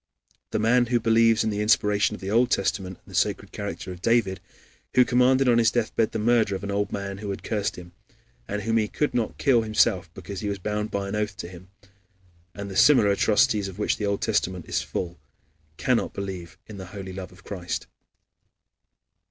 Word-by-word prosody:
The - - -1
man 120 +3 +3
who 120 0 +2
believes 115 0 +4
in 110 - 0
the 105 0 -2
inspiration 105 0 +2
of - - -12
the 95 +1 -4
Old 120 +3 +3
Testament 95 -2 -1
and - - -19
the - - -8
sacred - - 0
character 95 -3 -5
of 90 -1 -9
David, 115 -4 +2 0.6
who 125 - +6
commanded 125 +2 +3
on 120 -1 +5
his 115 -1 +5
deathbed 115 -2 0
the - - -3
murder 110 -2 +2
of 95 - -6
an 100 - -3
old 100 0 -1
man 100 -1 -4
who 105 -1 -5
had 100 - -5
cursed 105 -2 -2
him, 90 -1 -11 0.6
and 105 0 -3
whom 115 +1 +1
he 110 -1 +2
could 150 +7 -1
not 120 -3 -1
kill 130 -5 +3
himself 110 -6 +1
because 95 +1 -7
he 105 - -3
was 100 - -2
bound 105 +2 -3
by 100 0 -3
an 100 - -3
oath 105 -2 -2
to - - -6
him, 90 +1 -13 0.9
and 100 0 -6
the - - -7
similar 110 -4 +6
atrocities 105 0 +2
of 95 -1 -9
which 105 - 0
the 105 - -2
Old 100 0 -1
Testament 95 -5 -1
is - - 0
full, 85 -1 -5 0.6
cannot - - 0
believe 95 -4 -6
in 105 - -10
the 95 -2 -8
holy 95 0 -8
love 95 -1 -7
of 90 +1 -18
Christ. 90 -4 -4
105 Hz, 210 wpm, -25 LUFS, 95-115 Hz, 0.9 s, who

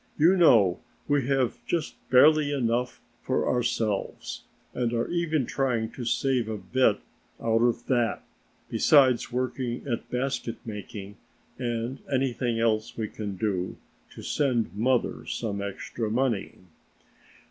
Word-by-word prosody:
You 170 +5 +5
know 115 - +5 0.3
we 145 -3 +1
have 135 -3 0
just 170 -3 -1 0.2
barely 145 +3 +6
enough 125 -2 0 0.2
for - - 0
ourselves 115 -4 -1 0.3
and 120 -1 -1
are 115 0 0
even 160 -5 0
trying 120 -4 -1
to 125 - -7
save 125 -1 +1
a 110 - -3
bit 110 +2 +2 0.4
out 115 0 +1
of 120 0 +1
that, 120 -3 0 0.4
besides 130 -5 +4
working 125 0 -2
at 120 -4 -3
basket 125 -2 -2
making 105 -2 -7 0.4
and 120 +1 -2
anything 125 -3 0
else 110 -1 0
we 110 -2 -2
can 105 -3 -5
do, 95 -2 -2 0.4
to - - -9
send 125 -8 0
mother 120 +4 0
some 100 -4 -3
extra 100 +3 -4
money." 115 -2 0
120 Hz, 125 wpm, -27 LUFS, 110-130 Hz, 0.4 s, barely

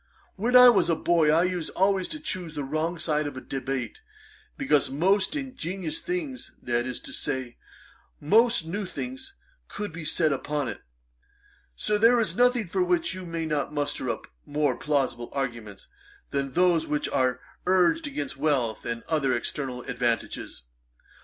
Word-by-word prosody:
When 235 +5 0
I 250 0 +11
was 190 -7 +4
a 165 - +3
boy, 160 -1 +3
I 160 +3 +5
used 180 -3 -1
always 190 0 +2
to 310 - -6
choose 180 - -4
the 145 - -2
wrong 155 +5 -1
side 155 -2 0
of 145 - -6
a - - -3
debate, 130 -3 -4 0.6
because 145 +1 +2
most 190 - +2
ingenious 190 - -4
things, 325 -7 -4
that 120 0 -1
is 125 - -4
to - - -8
say, 130 -4 -3 0.6
most 220 +3 +4
new 200 +5 -3
things, 265 - -7 0.3
could 205 -4 -5
be 165 0 -6
said 155 0 +2
upon 145 0 -2
it. - - -7 0.9
Sir, 210 - 0
there 235 +2 +6
is 200 -7 0
nothing 245 -1 +3
for 180 - -1
which 355 - +1
you 185 -1 -7
may 165 -1 -3
not 150 -1 -2
muster 145 0 -1
up - - -3 0.2
more 145 -3 0
plausible 135 -5 -1
arguments, 120 -7 -4 0.4
than 140 -1 -2
those 175 -2 +3
which 150 - 0
are 130 -1 +1 0.3
urged 190 - +3
against 145 - -4
wealth 135 -7 0
and 115 0 -3
other 140 -6 +1
external 125 +1 -3
advantages. 120 - -2
160 Hz, 160 wpm, -27 LUFS, 135-200 Hz, 0.9 s, I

